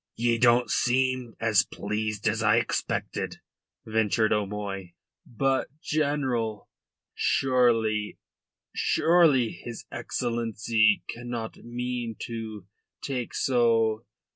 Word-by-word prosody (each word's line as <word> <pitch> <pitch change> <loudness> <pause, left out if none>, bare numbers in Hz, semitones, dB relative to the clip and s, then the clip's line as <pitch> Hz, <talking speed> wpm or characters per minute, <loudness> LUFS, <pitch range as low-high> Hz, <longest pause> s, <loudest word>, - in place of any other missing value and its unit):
"Ye 115 0 +1
don't 120 0 +4
seem 130 -1 +1
as 110 -4 +4
pleased 105 0 -3
as 110 +1 +1
I 110 0 +4
expected," 115 - -2 0.5
ventured 110 0 +2
O'Moy. 100 -3 -3 0.3
"But, 135 +2 0
General, 135 -9 -1 0.5
surely... 115 -5 +2 0.6
surely 160 -9 +3
his 120 -1 -9
Excellency 115 -3 +1
cannot 120 -2 -5
mean 120 -1 -4
to 110 -4 -6 0.4
take 125 -4 -3
so... 115 -3 +2
115 Hz, 90 wpm, -27 LUFS, 110-125 Hz, 0.6 s, don't